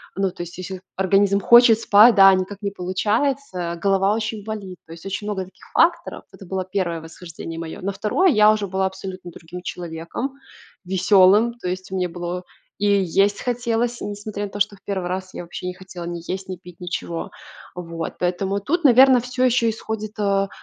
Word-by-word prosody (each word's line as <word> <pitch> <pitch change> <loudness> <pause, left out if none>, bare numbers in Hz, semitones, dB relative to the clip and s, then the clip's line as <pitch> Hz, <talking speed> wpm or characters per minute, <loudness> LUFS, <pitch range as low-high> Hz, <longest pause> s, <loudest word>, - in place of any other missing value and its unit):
ну, 195 0 +1
то 175 - -7
есть 175 0 -10
если 185 0 -6 0.2
организм 195 +1 +3
хочет 235 +2 +7
спать, 220 +2 +7
да, 195 -1 +8
а 190 - +5
никак 190 +2 -4
не 200 - -2
получается, 190 0 -1
голова 195 0 +3
очень 220 -1 -3
болит. 205 -4 -6
То 160 - -15
есть 165 +2 -13
очень 195 +2 -4
много 195 -3 -2
таких 185 +1 -20
факторов. 340 0 +2
Это 195 - -12
было 185 +1 -3
1 185 -3 -2
восхождение 165 0 -9
мое. 165 -1 -6
На 195 +2 -2
2 220 - +2
я 215 -7 +6
уже 210 -2 -1
была 190 +1 -1
абсолютно 190 -1 -8
другим 175 +2 -10
человеком, 170 +11 -5 0.5
веселым, 195 +4 +4
то 180 - -3
есть 185 +1 -5
мне 185 -1 -1
было 175 +1 -5 0.3
и 205 - -1 0.2
есть 200 +4 +2
хотелось, 240 -1 -1
и - - -3
несмотря 205 0 -5
на 200 - -7
то, 205 - -7
что 200 0 +1
в 195 - -25
1 190 -3 -3
раз 185 +1 -4
я - - -6
вообще 175 +1 -8
не 180 - -3
хотела 185 -1 -10
ни 170 0 -5
есть, 190 +1 -4
ни 185 - -5
пить, 180 0 -15
ничего. 170 -1 -4 0.4
Вот. 165 -2 -6
Поэтому 190 +3 -1
тут, 340 - -1
наверно, 260 -1 +7
всё 250 +1 -1
еще 235 -2 +3
исходит, 220 -1 -5
э, 195 -1 +1
195 Hz, 195 wpm, -22 LUFS, 180-215 Hz, 0.5 s, да